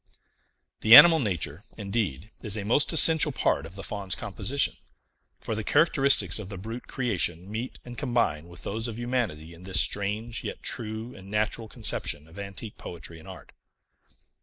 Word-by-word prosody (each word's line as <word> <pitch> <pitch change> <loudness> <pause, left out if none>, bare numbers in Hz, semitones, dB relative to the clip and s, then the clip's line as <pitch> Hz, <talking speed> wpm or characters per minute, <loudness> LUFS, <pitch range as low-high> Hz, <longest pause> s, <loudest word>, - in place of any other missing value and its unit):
The 110 +2 +8
animal 165 +4 +10
nature, 90 - -2 0.2
indeed, 100 - -3
is 105 -2 -1
a 100 - -4
most 120 +7 +3
essential 160 -1 +4
part 105 - 0
of 90 - -13
the 100 - -8
Faun's 100 -3 -2
composition; 115 +5 -1 0.6
for - - -4
the 110 0 -3
characteristics 140 -3 +3
of 100 -3 -7
the 100 - -7
brute 115 +6 -7
creation 95 -7 -2
meet 115 +4 -5
and 120 0 -9
combine 115 - 0
with 85 0 -10
those 110 +3 -3
of 115 -1 -6
humanity 120 -11 -3
in 85 - -15
this 95 0 +2
strange 105 +3 0
yet - - -6
true 110 +2 -2
and 95 0 -13
natural 105 +2 -1
conception 75 -7 -3
of 85 +5 -13
antique 100 +2 -8
poetry 85 -1 -8
and 80 - -14
art. - - -12
105 Hz, 165 wpm, -27 LUFS, 95-120 Hz, 0.6 s, animal